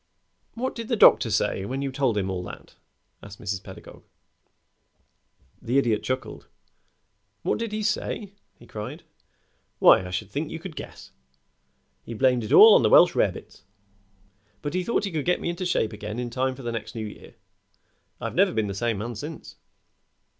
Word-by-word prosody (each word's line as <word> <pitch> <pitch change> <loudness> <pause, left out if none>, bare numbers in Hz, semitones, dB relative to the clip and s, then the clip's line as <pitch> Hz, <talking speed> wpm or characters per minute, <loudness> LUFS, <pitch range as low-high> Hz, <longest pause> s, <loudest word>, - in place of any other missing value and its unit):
"What 255 +3 -2
did 230 -2 -6
the 235 - 0
doctor - - +6
say 95 - 0
when 130 +7 -4
you 135 - -2
told 130 -5 0
him 95 -1 -1
all 90 -1 -3
that?" - - -11 0.5
asked 100 0 -12
Mrs. 100 -2 -4
Pedagog. 95 - -12 1.6
The 125 +4 0
Idiot 115 -6 +2
chuckled. 130 0 -5 1.0
"What - - 0
did 230 -2 -3
he 215 0 -3
say?" 210 -1 -2 0.2
he 120 - -16
cried. 105 -2 -8 0.7
"Why, - - +6
I 90 - -7
should 95 +2 -4
think 150 +2 -3
you 160 - -5
could 165 -1 -9
guess. - - -10 0.9
He 115 - -8
blamed 125 0 +2
it 105 - -6
all 220 0 +9
on - - +6
the 110 - +3
Welsh - - +7
rarebits, - - -2 1.0
but 145 - -3
he 185 0 0
thought 230 +1 0
he 200 - -4
could 155 -3 -2
get 180 - +2
me - - -3
into 175 +1 -4
shape 110 -10 0
again 105 +1 -6
in 120 -1 -4
time 130 +1 -1
for 135 - -11
the 120 - -3
next 115 +1 -6
New 110 -1 -4
Year. 105 - -11 0.8
I've - - -4
never - - +3
been 110 -1 0
the 100 - -4
same 115 +2 -1
man 115 +4 -4
since." 150 +8 -9
125 Hz, 180 wpm, -25 LUFS, 105-165 Hz, 1.6 s, all